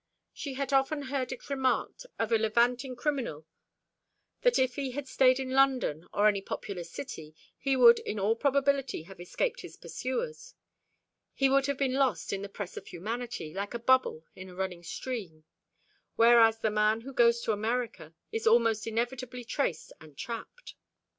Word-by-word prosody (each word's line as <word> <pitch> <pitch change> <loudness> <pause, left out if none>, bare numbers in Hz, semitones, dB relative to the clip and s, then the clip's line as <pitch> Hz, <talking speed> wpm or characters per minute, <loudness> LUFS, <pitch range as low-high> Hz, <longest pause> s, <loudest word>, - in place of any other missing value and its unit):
She 275 -3 -6
had 275 0 -3
often 275 +2 +2
heard 265 -1 -2
it 260 - -8
remarked 275 - -1
of 225 0 -1
a 225 - +4
levanting 240 +4 +1
criminal 245 - -2 1.0
that - - +4
if 260 -1 +2
he 275 -3 -3
had 285 +1 -5
stayed 255 0 +4
in 260 -1 -4
London 260 - +2
or 205 +1 +3
any 200 -2 +2
populous 180 -3 -6
city, 160 - -8 0.2
he 275 -1 0
would 235 -2 +8
in 210 - -4
all 210 +3 +2
probability 275 - +1
have 190 +2 -13
escaped - - -2
his - - -11
pursuers; 465 - -5 0.8
he 270 -1 +3
would 275 0 +3
have 280 -1 -1
been 265 -2 0
lost 265 -6 +1
in 195 - -2
the 200 - -6
press 200 -2 -7
of - - -8
humanity, 215 -3 -5
like 200 +4 -4
a - - -2
bubble 235 -10 +2
in 185 0 -9
a 180 - -12
running 185 -2 -3
stream; 175 -4 -6 0.7
whereas 230 -1 +6
the 220 -1 0
man 215 +1 +2
who 270 +3 -9
goes 235 -1 +4
to 225 - 0
America 210 -7 -3 0.2
is 225 0 -2
almost 225 -1 +3
inevitably 245 +2 -3
traced 240 - -2
and 155 -3 -15
trapped. 235 - -7
235 Hz, 170 wpm, -29 LUFS, 205-265 Hz, 1.0 s, would